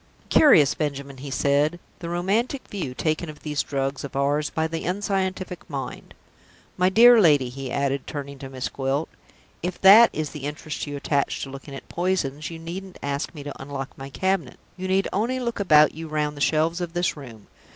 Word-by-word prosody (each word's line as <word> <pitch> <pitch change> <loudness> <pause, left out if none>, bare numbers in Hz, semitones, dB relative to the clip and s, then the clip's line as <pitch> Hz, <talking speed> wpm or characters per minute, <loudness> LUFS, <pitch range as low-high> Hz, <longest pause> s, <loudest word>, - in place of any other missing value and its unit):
"Curious, 155 - +6
Benjamin," 140 -2 -4
he 140 +2 -7
said, 145 +5 +1 0.2
"the 170 - -6
romantic 205 +10 -1
view 165 -11 -5
taken 155 +3 -1
of 150 - -10
these 150 -2 -1
drugs 135 -1 -3
of 140 -2 -7
ours 145 +2 +1
by 160 - -1
the 165 0 -3
unscientific 190 -2 -2
mind! 140 -3 -6 0.6
My 180 0 +3
dear 235 +3 +7
lady," 145 -8 +4
he 135 +1 -6
added, 140 -1 -1
turning 140 -1 -6
to 135 - -8
Miss 130 -1 -4
Gwilt, 135 +3 -2 0.5
"if 180 +1 -4
that 210 +5 +9
is 155 -2 -3
the 150 -3 -7
interest 150 +1 -5
you 145 0 -4
attach 140 0 -1
to 135 - -7
looking 135 +1 -9
at - - -10
poisons, 165 -5 -1
you 165 - -7
needn't 180 +3 -7
ask 140 +4 -3
me 145 - -7
to 145 -2 -8
unlock 135 -1 -6
my 135 0 -8
cabinet 190 -2 -1 0.2
you 185 0 -5
need 190 +1 +2
only 235 +6 0
look 235 -3 -3
about 155 -6 +5
you 160 +1 -7
round 150 -1 -1
the 145 - -9
shelves 160 +4 +1
of 170 -1 -4
this 175 0 0
room. 120 -8 -11
155 Hz, 195 wpm, -24 LUFS, 140-180 Hz, 0.6 s, that